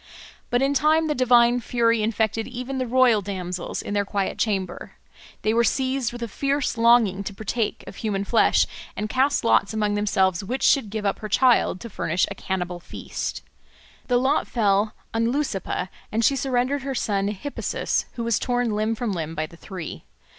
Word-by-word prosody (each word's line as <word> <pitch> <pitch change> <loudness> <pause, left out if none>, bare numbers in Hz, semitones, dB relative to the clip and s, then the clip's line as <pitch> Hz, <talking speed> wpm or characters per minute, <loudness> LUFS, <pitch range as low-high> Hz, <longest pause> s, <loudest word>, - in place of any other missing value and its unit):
But 245 +2 +2
in 275 +1 +2
time 310 +3 +3
the 305 - 0
divine 245 -2 +4
fury 230 -1 +1
infected 220 0 0
even 255 +2 -5
the 255 - -1
royal 245 -3 +4
damsels 185 -3 -4
in - - -4
their 205 0 +2
quiet 200 -1 -2
chamber; 190 -5 -2 0.5
they 215 - +2
were 235 +1 +3
seized 260 0 0
with 240 0 -6
a - - -2
fierce 275 +5 -1
longing 230 -4 +4
to 200 0 -6
partake 220 +2 -2
of - - -10
human 200 -3 -1
flesh, 230 - +4 0.3
and 210 +1 -3
cast 270 +2 +2
lots 220 -2 +3
among 210 -1 +1
themselves 195 -3 +1
which 250 +7 -3
should 265 -7 +4
give 210 0 -4
up 200 - 0
her 215 - -6
child 245 -4 +3
to 235 - -6
furnish 180 -4 0
a - - -4
cannibal 180 -2 -3
feast. - - -6 0.6
The 245 - +3
lot 265 +3 +1
fell 210 -2 +1 0.2
on 230 +1 +1
Leucippe, 220 -9 -2 0.2
and 225 +1 +1
she 275 - +4
surrendered 265 +1 0
her 270 0 -4
son 200 -4 0
Hippasus, 210 +8 -2
who 235 - -4
was 230 -2 +1
torn 245 -2 0
limb 215 +2 0
from 230 -1 -2
limb 165 -3 -4
by 155 0 -1
the 160 - -14
three. 180 -2 -8
225 Hz, 185 wpm, -24 LUFS, 200-250 Hz, 0.6 s, divine